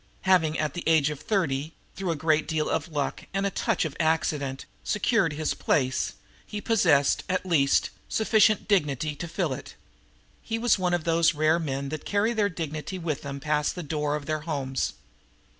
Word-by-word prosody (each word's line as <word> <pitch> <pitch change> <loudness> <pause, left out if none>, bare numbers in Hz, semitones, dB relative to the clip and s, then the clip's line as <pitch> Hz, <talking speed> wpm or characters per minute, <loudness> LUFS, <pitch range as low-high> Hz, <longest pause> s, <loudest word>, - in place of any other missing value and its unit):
Having 170 -5 +3
at 155 -3 -1
the 175 - -5
age 155 -2 +4
of 150 - -6
thirty, 155 -7 -1 0.2
through 190 -2 -3
a 165 - +1
great 155 +1 +1
deal 155 -2 0
of 160 +1 -2
luck 145 -2 -2
and 195 0 +1
a 200 - 0
touch 185 - 0
of 150 -3 -4
accident, 150 -4 0 0.2
secured 210 -6 +1
his 155 +1 -1
place, 130 -3 0 0.3
he 210 - -6
possessed, 165 - +3
at 185 0 0
least, 145 -6 +3 0.2
sufficient 215 -1 +3
dignity 150 - +1
to 170 - -5
fill 165 - -1
it. - - -9 0.7
He 225 - -3
was 230 -3 +3
one 180 -1 +2
of 175 - -3
those 165 0 +3
rare 155 +2 +3
men 140 -3 -3
who 155 - -3
carry 205 +7 0
their 210 -3 +2
dignity 160 0 -5
with 165 -5 -3
them 140 0 -6
past 150 +1 0
the 180 - -5
doors 150 0 -1
of 145 - -9
their 155 0 -1
homes. 140 -4 -2
160 Hz, 185 wpm, -27 LUFS, 150-185 Hz, 0.7 s, age